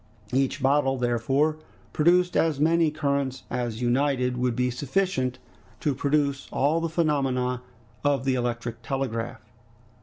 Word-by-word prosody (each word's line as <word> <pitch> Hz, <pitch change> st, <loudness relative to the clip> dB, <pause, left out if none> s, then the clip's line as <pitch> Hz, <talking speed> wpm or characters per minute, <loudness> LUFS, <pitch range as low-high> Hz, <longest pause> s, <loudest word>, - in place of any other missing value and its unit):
Each 135 Hz, +1 st, 0 dB
bottle, 135 Hz, -1 st, +3 dB
therefore, 130 Hz, +6 st, +1 dB, 0.4 s
produced 180 Hz, +3 st, +3 dB
as 160 Hz, -4 st, +2 dB
many 165 Hz, +1 st, +3 dB
currents 140 Hz, -3 st, -1 dB
as 120 Hz, -1 st, -2 dB
united 125 Hz, 0 st, +1 dB
would 125 Hz, -1 st, 0 dB
be 125 Hz, 0 st, +1 dB
sufficient 130 Hz, -1 st, -1 dB, 0.4 s
to 145 Hz, -, 0 dB
produce 140 Hz, 0 st, 0 dB
all 155 Hz, +4 st, +1 dB
the 165 Hz, -, -1 dB
phenomena 135 Hz, -6 st, 0 dB, 0.4 s
of 140 Hz, -3 st, +1 dB
the 135 Hz, -, +2 dB
electric 120 Hz, -1 st, -2 dB
telegraph. 120 Hz, -3 st, -3 dB
135 Hz, 125 wpm, -26 LUFS, 125-150 Hz, 0.4 s, bottle